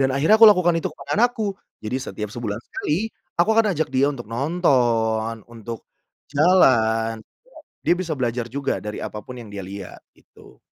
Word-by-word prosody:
dan 135 - +3
akhirnya 150 +11 +4
aku 225 - +11
lakukan 180 -4 +4
itu - - -2
ke - - -13
anak 240 +3 +4
aku 210 -3 -1 0.3
jadi 115 +4 -2
setiap 105 -5 -5
sebulan 110 -3 -4
sekali, 180 +9 -2 0.3
aku 175 - +3
akan 225 - +5
ajak 160 - 0
dia 135 +2 +3
untuk 120 -4 -8
nonton 115 -6 +1
untuk 115 0 -8 0.5
jalan 115 -9 +3 0.7
dia - - +5
bisa 170 -4 -2
belajar 120 -1 -1
juga 140 +2 -2
dari 105 0 -5
apapun 110 +4 -7
yang 115 - -12
dia 100 -1 -6
lihat, 95 -1 -9 0.2
itu. - - -19
125 Hz, 170 wpm, -22 LUFS, 110-165 Hz, 0.7 s, aku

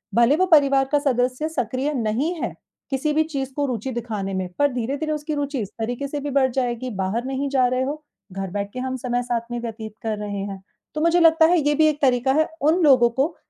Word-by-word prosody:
भले 235 +4 +5
वो 370 - +3
परिवार 280 -6 +4
का 295 - +4
सदस्य 255 +1 0
सक्रिय 260 0 -2
नहीं 250 +6 0
है - - -2 0.4
किसी 285 +2 0
भी 315 +1 +3
चीज़ 275 -4 -4
को 290 - 0
रुचि 255 -1 -3
दिखाने 220 -5 -4
में, 190 -1 -2
पर 285 -1 +3
धीरे-धीरे 275 +6 -2
उसकी 300 0 -3
रुचि 285 -1 -2
इस 200 - -5
तरीक़े 245 +5 -2
से 290 +1 -4
भी 290 +1 -4
बढ़ 265 -1 +3
जाएगी 250 0 -2
बाहर 215 +6 -1
नहीं 270 +1 -2
जा 265 -2 +3
रहे 255 +1 0
हो, 295 +3 -4 0.3
घर 195 0 -4
बैठ 200 +1 -3
के 255 - -5
हम 260 0 -3
समय 245 0 -2
साथ 240 -1 -3
में 240 - -2
व्यतीत 220 -2 -6
कर 220 -2 -2
रहे 205 -1 -4
हैं। 195 -1 -8 0.3
तो 305 - -1
मुझे 335 +2 +4
लगता 325 -1 +6
है 345 +1 +4
ये 295 0 +1
भी 310 +1 +4
एक 295 -1 -4
तरीक़ा 260 -1 +3
है 315 - 0
उन 315 +5 +3
लोगों 255 -5 +6
को 320 +4 0
265 Hz, 235 wpm, -23 LUFS, 235-295 Hz, 0.4 s, लगता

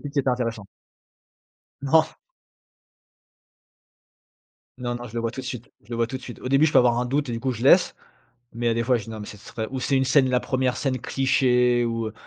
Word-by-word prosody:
pitch 145 +1 -8
était 135 -1 +1
intéressant. 115 -4 -3 1.2
Non. 160 +3 +4 2.7
Non, 120 -1 -3
non, 120 0 -6
je 115 - -13
le 115 - -1
vois 115 - -1
tout 130 - -6
de 130 - -9
suite, 125 +1 -7
je 115 - -21
le 115 - -3
vois 115 0 +1
tout 130 - -5
de 130 - -11
suite. 120 - -10
Au 125 - -5
début, 140 +3 +4
je 155 - -1
peux - - +6
avoir 120 -1 +3
un 125 - 0
doute 140 +1 -1
et - - -3
du 115 - -4
coup, 130 0 -1
je 115 0 -7
laisse, 175 +7 +5 0.6
mais 120 +1 -4
il - - +4
y - - +2
a - - +2
des 115 - -1
fois, 125 0 +2
je 110 - -7
dis 115 - -11
«non, 110 - -7
mais, 105 - -7
ce 105 - -10
serait», 110 +2 -6
ou 130 -1 -4
c'est 135 +2 0
une 130 - +1
scène, 130 0 +3
la 125 - +2
1re 130 0 -1
scène 135 -2 -1
cliché, 125 -2 +2
ou, 115 -1 -2
heu, 110 - -7
125 Hz, 255 wpm, -24 LUFS, 115-130 Hz, 2.7 s, peux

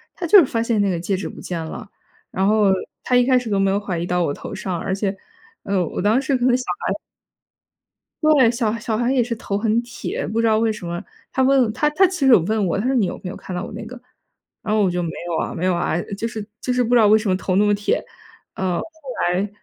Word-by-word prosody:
她 355 - -4
就 405 +5 +8
是 340 - +6
发 230 -2 -1
现 230 -2 +1
那 200 -1 +2
个 175 - -1
戒 190 +3 -1
指 190 - -4
不 - - -10
见 170 -3 -4
了， 180 +6 -8 0.4
然 190 +1 0
后 210 0 +3 0.4
她 250 - +1
一 245 0 +4
开 255 -1 +4
始 245 -3 -5
都 200 - +1
没 195 0 +2
有 195 - +1
怀 195 -4 -3
疑 170 - -2
到 180 0 0
我 145 - 0
头 - - -8
上， 185 -3 -3
而 190 - -2
且， 195 0 -2 0.5
呃， 195 -2 0
我 - - -4
当 215 +6 +3
时 275 0 0
可 245 - -2
能 250 -1 +4
小 255 - -5 0.2
孩 - - +1 1.3
对， 295 -6 +5
小 230 -2 -1
小 220 0 -2
孩 240 +2 +1
也 255 - +3
是 235 0 -2
头 200 -2 -3
很 220 +2 +1
铁， 240 0 -5
不 220 +3 -1
知 230 - +2
道 220 -1 +3
为 225 0 +2
什 210 - -9
么， 175 0 -4 0.3
她 - - -1
问 260 -4 +3
她 300 +6 +1
她 360 +6 +3
其 365 -1 -6
实 - - +6
有 225 - +8
问 210 +4 0
我， 170 - 0
她 200 - -2
说 265 - +1
你 225 -7 +3
有 - - -4
没 180 - -5
有 - - -8
看 185 - -8
到 180 - -3
我 - - -8
那 220 +2 -6
个， 250 +2 -10 0.6
然 215 - -1
后 215 - +3
我 190 - +2
就 175 0 -1
没 170 - -2 0.2
有 170 -2 -2
啊 - - -3
没 175 - -3
有 185 -1 +2
啊， 175 -1 0 0.2
就 225 - -3
是 225 -2 -5 0.2
就 250 - -1
是 250 0 +2
不 245 +1 +1
知 - - +7
道 220 - +6
为 215 - +6
什 215 -1 -1
么 185 - +2
头 185 0 -2
那 205 - +4
么 205 0 +3
铁， 205 0 0 0.5
呃。 185 -2 -1
后 280 - -4
来 195 +3 0
215 Hz, 305 characters per minute, -21 LUFS, 190-245 Hz, 1.3 s, 就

